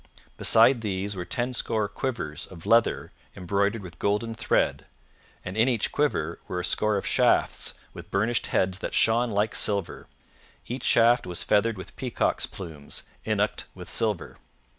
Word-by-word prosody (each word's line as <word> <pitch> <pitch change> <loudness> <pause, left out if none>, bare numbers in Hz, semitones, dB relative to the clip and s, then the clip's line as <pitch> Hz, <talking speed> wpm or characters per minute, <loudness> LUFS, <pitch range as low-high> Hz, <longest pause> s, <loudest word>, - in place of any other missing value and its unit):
Beside 115 +2 +5
these 100 -1 -2
were 90 -2 -4
tenscore 120 -3 -1
quivers 100 - -4
of 85 -3 -12
leather 115 0 +2 0.2
embroidered 100 +4 0
with 90 -2 -10
golden 105 +3 0
thread, 110 - 0 0.6
and 90 - -5
in 110 +3 +3
each 120 -5 0
quiver 85 - 0
were 90 - -3
a 90 - -1
score 105 +3 +1
of 100 - -4
shafts - - +2 0.2
with - - -10
burnished 110 +4 0
heads 95 0 0
that - - -4
shone 115 +2 +3
like 105 0 0
silver; 100 -4 0 0.6
each 125 +3 -5
shaft 120 -1 +4
was 90 -1 -3
feathered 105 +1 +2
with 95 0 -10
peacock's 125 -2 0
plumes, 80 -8 -7 0.2
innocked - - 0
with - - -9
silver. 105 -7 -1
105 Hz, 150 wpm, -26 LUFS, 95-115 Hz, 0.6 s, Beside